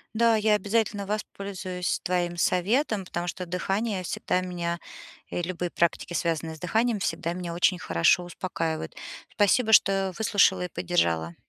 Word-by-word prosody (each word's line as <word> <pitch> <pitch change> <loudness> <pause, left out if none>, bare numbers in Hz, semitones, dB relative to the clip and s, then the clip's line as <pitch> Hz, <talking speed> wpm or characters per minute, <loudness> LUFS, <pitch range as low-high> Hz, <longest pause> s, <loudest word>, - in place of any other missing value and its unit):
Да, 230 0 +4
я 215 0 +3
обязательно 210 0 0
воспользуюсь 195 -3 -3
твоим 175 -1 0
советом, 200 - +1
потому 175 0 -4
что 180 +1 -4
дыхание 195 +3 -1
всегда 180 +1 -1
меня- 170 -2 -3 0.5
и - - -2
любые 175 0 -3
практики, 170 +1 0
связанные 165 -1 -1
с - - -15
дыханием- 225 +7 +1
всегда 170 -3 -2
меня 175 -1 -5
очень 180 +2 +2
хорошо 85 - +2
успокаивают. 165 -3 -4 0.4
Спасибо, 220 +3 +3
что 195 -2 +5
выслушала 190 -4 +3
и - - -6
поддержала. 85 - 0
180 Hz, 140 wpm, -26 LUFS, 175-205 Hz, 0.5 s, что